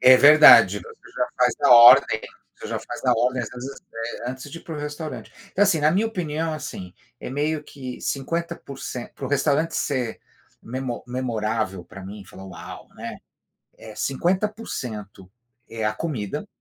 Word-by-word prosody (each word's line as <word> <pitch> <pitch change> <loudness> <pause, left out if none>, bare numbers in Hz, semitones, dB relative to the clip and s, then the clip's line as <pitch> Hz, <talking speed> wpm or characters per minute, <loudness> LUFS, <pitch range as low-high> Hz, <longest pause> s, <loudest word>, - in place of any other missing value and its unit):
É 130 0 +8
verdade. 150 +3 +8
Você 450 -1 -15
já 125 0 0
faz 125 -1 +3
na - - +3
ordem, 120 -1 +8
né, - - -10 0.3
você - - -8
já - - -2
faz - - -8
na - - +3
ordem, 125 +2 0
às - - -5
vezes, 130 +3 -8 0.4
eh, 125 - -2
antes 130 +2 -9
de 165 - -8
ir - - -17
para 165 - -7
o - - -5
restaurante. 150 +1 -6 0.2
Então 200 - +2
assim, 175 -6 +2
na 150 +1 +4
minha 205 +6 +2
opinião, 165 -6 -3
assim, 120 -12 -7 0.3
é - - -6
meio 150 +2 -1
que 130 -4 -9
50 170 +5 -3
por 140 -1 -11
cen 125 -1 -6
para 135 - -7
o - - -5
restaurante 145 +3 +1
ser 125 -5 -2 0.4
memo 125 0 -5
memorável 110 -7 -2
pra 95 +2 -11
mim, 100 0 -9
falar: 95 0 -12
"Uau", 90 - -10
né. - - -7 0.6
É 110 -1 -11
50% 135 - -3 0.4
é 115 -1 -5
a 105 - +1
comida 125 -12 -4
130 Hz, 180 wpm, -23 LUFS, 115-155 Hz, 0.6 s, É